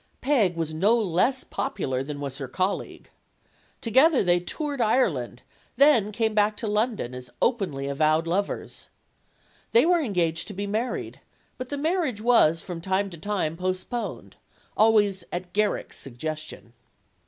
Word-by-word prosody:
Peg 225 - +2
was 165 -2 -3
no 200 +9 +3
less 225 +6 +1
popular 130 -9 -3
than 145 +1 -6
was 140 -1 -5
her 135 - -4
colleague. 185 +9 -3 0.7
Together 265 +5 +4
they 175 -1 +3
toured 285 - -4
Ireland, 175 - +1 0.3
then 240 -6 +5
came 220 +1 0
back 210 0 +2
to 225 - -4
London, 210 - -1
as 125 0 -8
openly 190 - 0
avowed 155 +3 +2
lovers. 190 +4 -3 0.8
They 460 - +6
were 345 0 +3
engaged 175 - -1
to 205 - -7
be 200 +2 -3
married; 220 +5 -3 0.4
but 255 0 -5
the 285 - -3
marriage 310 - 0
was 215 -9 +4
from 175 -3 -6
time 190 +2 0
to 170 - -9
time 190 -5 -2
postponed. 185 +6 -4 0.4
Always 205 -4 +3
at 175 0 -5
Garrick's 210 0 -1
suggestion. 150 -1 -7
200 Hz, 140 wpm, -25 LUFS, 160-235 Hz, 0.8 s, They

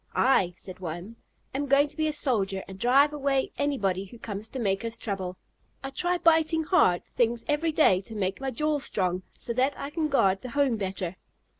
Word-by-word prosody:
"I," 190 -9 +3
said 185 -1 -9
one, 180 +6 -6 0.4
"am 285 +2 -2
going 280 +2 +4
to - - -13
be 315 -1 0
a - - +1
soldier, 200 -10 0
and 190 0 -10
drive 275 +6 +4
away 275 -2 0
anybody 195 -10 0
who 215 +5 -13
comes 215 -1 -6
to 265 - -7
make 195 -3 0
us 230 0 -3
trouble. 190 -4 -4 0.5
I 270 - -4
try 355 +6 0
biting 325 -1 +3
hard 300 - +3
things 235 -1 0
every 305 +2 +1
day 245 - +4
to 220 +3 -10
make 195 +2 -2
my 270 - -1
jaws 295 +3 0
strong, 185 -2 0 0.2
so 235 - -4
that 260 +4 +1
I 280 - -5
can 315 0 0
guard 195 -9 +2
the 250 - -6
home 275 -3 +1
better." 190 -2 -4
240 Hz, 200 wpm, -27 LUFS, 195-285 Hz, 0.5 s, going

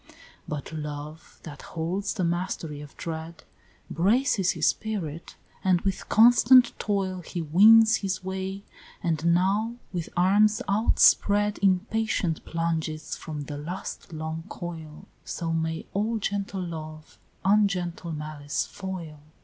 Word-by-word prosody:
But 150 +1 -5
Love, 150 +1 -7
that 145 -3 -9
holds 185 +6 -3
the 190 - -1
mastery 170 -3 -2
of 145 -1 -12
dread, 165 0 -6 0.4
Braces 200 - +2
his - - -1
spirit, 175 -8 -2 0.3
and 185 -2 +3
with 195 -1 -3
constant 240 +2 +6
toil 190 -3 -1
He 175 - -6
wins 220 +7 +6
his 190 -3 -3
way, 190 +1 -4 0.4
and 160 -3 0
now, 205 +6 +1 0.2
with 170 -3 -3
arms 210 +4 +4
outspread, 205 0 +3
Impatient 195 -2 +1
plunges 160 -2 -2
from 155 -2 -6
the 145 0 -6
last 175 +3 -6
long 160 0 -5
coil; 160 -3 -8 0.2
So 165 -1 -3
may 160 0 -2
all 220 +3 0
gentle 200 -2 -3
Love 155 -2 -8 0.3
ungentle 185 -4 +1
Malice 150 -1 -3
foil! 180 -6 -7
175 Hz, 120 wpm, -26 LUFS, 160-200 Hz, 0.4 s, constant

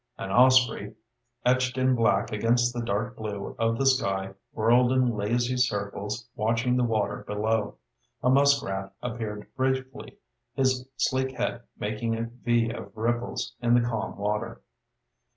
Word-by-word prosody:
An 95 - -5
osprey, 125 -3 +4 0.5
etched 125 0 +2
in 130 0 +3
black 110 -5 +2
against 120 +3 +2
the 120 - -3
dark 115 +2 -2
blue 105 -2 -5
of 115 0 +1
the 135 - 0
sky, 95 -7 +1 0.2
whirled 120 +3 +3
in 130 -3 +2
lazy 120 +5 0
circles 105 -1 -2
watching 115 +3 +1
the 125 - +2
water 110 -3 -1
below. 105 +1 -1 0.5
A 125 - +3
muskrat 130 -9 +2
appeared 110 -3 -4
briefly, 130 0 -2 0.4
his 130 -1 +1
sleek 130 0 0
head 120 - -2 0.2
making 110 +2 -2
a 115 - -2 0.2
V 120 -1 +2
of 115 - -9
ripples 120 +2 -2
in 120 0 +3
the 120 -1 +3
calm 115 -3 -3
water. 105 +1 -3
115 Hz, 140 wpm, -27 LUFS, 105-125 Hz, 0.5 s, osprey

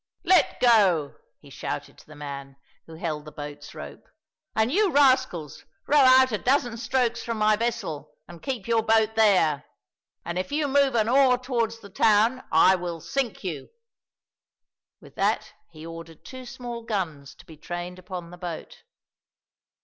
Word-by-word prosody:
"Let 365 -6 +3
go!" 195 - +4 0.3
he - - -16
shouted - - -5
to - - -19
the 155 - -13
man 140 -2 -8 0.3
who 165 - -11
held 155 -2 -4
the 150 - -11
boat's 145 0 -9
rope, - - -10 0.5
"and 220 +2 +2
you 400 +3 +2
rascals 260 - +2 0.2
row 295 - +4
out 260 -1 +6
a 210 - -1
dozen 245 -3 +1
strokes 240 0 0
from 230 -2 -4
my 215 0 +3
vessel 160 - -3 0.2
and 170 -1 -12
keep 250 -7 -4
your 230 -1 +2
boat 220 -1 +2
there; 185 -10 +3 0.6
and 170 +1 -3
if 185 - -4
you 295 0 0
move 280 -1 +2
an 220 -2 +2
oar 255 0 +4
towards 235 -3 -2
the 200 - -12
town 225 +6 +3
I 160 +4 +6
will 175 -2 -3
sink 240 - -3
you!" 160 -7 -5 1.3
With - - -16
that - - 0 0.2
he 160 -1 -12
ordered 165 -1 -10
two 255 -1 -9
small 240 -1 -7
guns 165 - -4
to - - -17
be 160 - -13
trained 175 +3 -7
upon 180 -2 -8
the 180 - -12
boat. 175 -3 -7
215 Hz, 165 wpm, -25 LUFS, 165-250 Hz, 1.3 s, out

